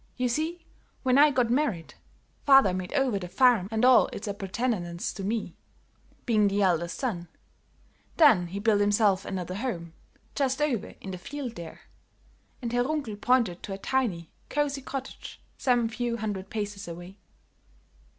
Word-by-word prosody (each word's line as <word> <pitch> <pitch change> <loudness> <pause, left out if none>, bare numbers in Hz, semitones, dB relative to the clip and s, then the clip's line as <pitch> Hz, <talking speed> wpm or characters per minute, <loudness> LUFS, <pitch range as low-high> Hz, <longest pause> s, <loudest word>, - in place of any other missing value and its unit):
You 250 0 0
see, 320 +7 -2 0.4
when 260 +1 +4
I 300 +1 +8
got 250 -4 +1
married, 240 - 0 0.5
father 270 -9 +6
made 185 -1 -4
over 265 -8 +1
the 180 - -6
farm 215 0 +4
and 220 +2 +1
all 255 0 +6
its 205 - -7
appurtenances 195 -3 -2
to 195 - -7
me, 220 +2 -2 0.7
being 215 -3 +3
the 200 +1 +1
eldest 170 -2 +1
son; 195 -11 -3 0.9
then 230 - +6
he 185 +4 -6
built 205 0 +2
himself 205 -1 +3
another 185 -2 -4
home, 185 -7 -4 0.4
just 270 -1 0
over 285 -8 -1
in 195 - -7
the 185 - -6
field, 275 +3 -6
there," 170 -7 -9 0.8
and 235 0 -3
Herr 245 0 +3
Runkel 280 -6 -2
pointed 235 -9 +2
to 195 - -6
a - - -5
tiny, 195 -8 -1 0.2
cosy 285 -1 -1
cottage 270 0 -7 0.2
some 245 -3 +2
few 235 +1 -2
hundred 205 -3 -4
paces 205 -2 -4
away. 175 +3 -9
220 Hz, 155 wpm, -27 LUFS, 190-255 Hz, 0.9 s, I